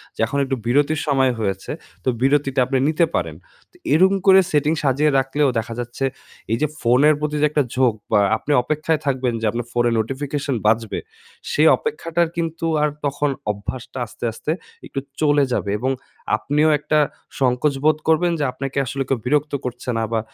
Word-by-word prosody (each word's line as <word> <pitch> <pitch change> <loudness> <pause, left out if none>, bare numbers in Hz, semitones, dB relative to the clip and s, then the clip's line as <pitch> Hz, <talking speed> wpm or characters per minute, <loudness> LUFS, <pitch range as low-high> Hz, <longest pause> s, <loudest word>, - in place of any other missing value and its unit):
যে - - -22
এখন 140 +5 -3
একটু 135 0 -1
বিরতির 145 +5 +2
সময় 135 -2 +3
হয়েছে 95 -3 -2 0.3
তো 130 - +1
বিরতিটা 135 -1 +2
আপনি 130 +1 0
নিতে 165 +2 +3
পারেন। - - -1 0.4
তো - - -33 0.2
এরকম 190 +4 +5
করে 190 0 +8
setting 150 +2 +2
সাজিয়ে 145 +2 +2
রাখলেও 135 +2 +1
দেখা 115 +1 -5
যাচ্ছে 120 +3 -3 0.5
এই 115 - +2
যে 155 - +3
ফোনের 130 +6 +5
প্রতি 150 0 -2
যে - - +5
একটা 150 -2 +2
ঝোঁক 125 -3 +3 0.2
বা 105 - +5 0.2
আপনি 150 - -4
অপেক্ষায় 155 +2 0
থাকবেন 130 -3 0
যে - - -1
আপনার 120 0 -3
ফোনে 120 0 +2
notification 135 +3 -2
বাজবে, 110 0 +1 0.5
সেই - - +4
অপেক্ষাটার 170 - -1
কিন্তু 165 0 -2 0.2
আর 150 - +3 0.2
তখন 145 +1 0 0.2
অভ্যাসটা 125 +5 -7
আস্তে, 110 - -13
আস্তে 150 +7 -4 0.3
একটু 135 - -4 0.2
চলে 145 -1 +4
যাবে 100 -4 -1
এবং 130 +2 0 0.5
আপনিও 150 +6 +2
একটা 155 +1 +1 0.4
সংকোচ 130 +2 +2
বোধ 155 0 +4
করবেন 170 +2 +3
যে, - - 0
আপনাকে 135 +1 -5
আসলে 135 +2 -2
কেউ 135 - +1
বিরক্ত 150 +2 +1
করছে 125 0 -5
না 115 - 0
বা 115 - +1
140 Hz, 175 wpm, -21 LUFS, 125-150 Hz, 0.5 s, করে